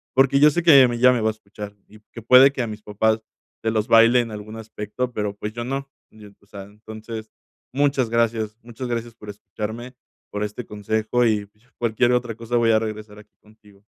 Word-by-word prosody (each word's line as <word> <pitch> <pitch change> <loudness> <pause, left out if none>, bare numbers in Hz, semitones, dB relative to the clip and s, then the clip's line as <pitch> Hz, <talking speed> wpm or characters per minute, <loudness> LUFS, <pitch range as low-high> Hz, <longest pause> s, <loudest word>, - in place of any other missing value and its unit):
porque 135 +1 +4
yo 150 +1 +7
sé 175 +3 -1
que 155 -5 +8
ella 120 - +2
ya 125 +2 +5
me 120 - -1
va 110 - +2
a - - 0
escuchar, 105 -1 -10
y 105 +1 -17
que 115 - -8
puede 130 +3 +7
que 135 - -4
a - - -3
mis 105 -1 -8
papás 110 +1 0 0.4
se 110 - +1
los 110 -1 -1
baile 115 +2 +6
en 115 - -6
algún 105 +1 -8
aspecto, 110 +3 -5
pero, 105 -2 -3
pues, 105 +1 -6
yo 120 +1 -5
no. 135 +2 -4 0.2
Yo, 105 -1 -14
o - - -25
sea, 100 -1 -9
entonces, 110 +2 -10 0.4
muchas 135 -4 +1
gracias, 115 -2 0
muchas 120 +2 -7
gracias 120 -1 -4
por 105 -2 -12
escucharme, 110 +4 -7 0.4
por 105 0 -3
este 105 +3 -5
consejo, 110 +3 -1
y, 105 -3 +1
pues, 105 +2 -34
ya, - - -33
cualquier 120 +1 +1
otra 120 -2 -1
cosa, 115 +1 -2
voy 115 -1 +3
a 110 - +4
regresar 110 -1 -7
aquí 105 - -19
contigo. 105 -2 -22
110 Hz, 220 wpm, -22 LUFS, 105-120 Hz, 0.4 s, que